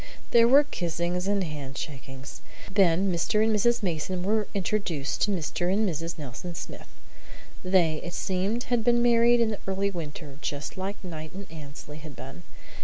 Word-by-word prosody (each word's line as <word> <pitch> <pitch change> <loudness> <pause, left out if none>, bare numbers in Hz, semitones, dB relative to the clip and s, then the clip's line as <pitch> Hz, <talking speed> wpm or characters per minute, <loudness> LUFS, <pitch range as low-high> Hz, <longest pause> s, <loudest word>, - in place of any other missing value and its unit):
There 230 0 +7
were 275 +4 +7
kissings 175 - -2
and 200 -1 +2
handshakings. 135 -3 -7 0.3
Then 190 -1 +4
Mr. 210 +5 +2
and 220 0 +3
Mrs. 235 +2 +2
Mason 180 +1 -1
were 215 +2 +1
introduced 180 -7 -1
to 210 - +3
Mr. 175 0 -1
and 210 +2 +2
Mrs. 165 -1 -3
Nelson 150 +4 -6
Smith. - - -7 0.8
They, 180 -4 +3
it 175 0 -5
seemed, 195 +6 0
had 240 -2 +1
been 240 0 +4
married 240 0 +5
in 230 -1 +3
the 210 - -4
early 195 +1 0
winter, 150 -4 -7
just 145 +1 -3
as 195 +2 -3
Knight 155 -3 -6
and 200 +1 -6
Annesley 150 -1 -9
had 150 -2 -10
been. 135 +7 -9
180 Hz, 165 wpm, -27 LUFS, 155-210 Hz, 0.8 s, There